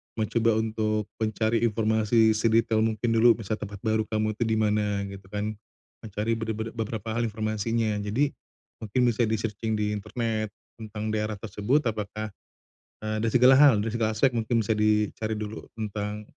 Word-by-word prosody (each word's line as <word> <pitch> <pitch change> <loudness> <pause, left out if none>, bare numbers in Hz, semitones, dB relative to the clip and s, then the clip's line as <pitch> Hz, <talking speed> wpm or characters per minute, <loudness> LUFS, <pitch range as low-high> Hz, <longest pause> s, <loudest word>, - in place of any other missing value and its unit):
mencoba 115 0 +1
untuk 110 -1 0 0.2
mencari 110 +1 +1
informasi 110 0 +3
sedetail 110 0 +2
mungkin 110 +1 0
dulu 115 +1 +6
bisa 110 -1 -4
tempat 100 0 -6
baru 110 0 +1
kamu 110 -1 0
itu 120 - 0
di 110 - +1
mana 105 -2 +1
gitu 100 -1 -10
kan, 105 +2 -3 0.5
mencari 105 +1 -3
be 110 - -4
be 110 +1 -4
beberapa 110 -1 -4
hal 115 +1 0
informasinya 110 +1 -1
jadi, 115 +8 0 0.5
mungkin 110 +3 -1
bisa 120 -1 +2
di 110 - +1
searching 110 0 -2
di 105 0 0
internet, 110 +1 -2 0.3
tentang 110 0 -4
daerah 110 0 -1
tersebut 110 +7 0
apakah, 110 -2 -3 0.7
eee, 110 0 -1
dari 115 - +1
segala 125 +2 +7
hal 135 -3 +7
dari 115 - -2
segala 110 -2 0
aspek 130 +4 +3
mungkin 115 -1 0
bisa 110 - +1
dicari 105 0 +1
dulu 105 0 -6
tentang, 105 -1 -4
110 Hz, 165 wpm, -27 LUFS, 105-115 Hz, 0.7 s, segala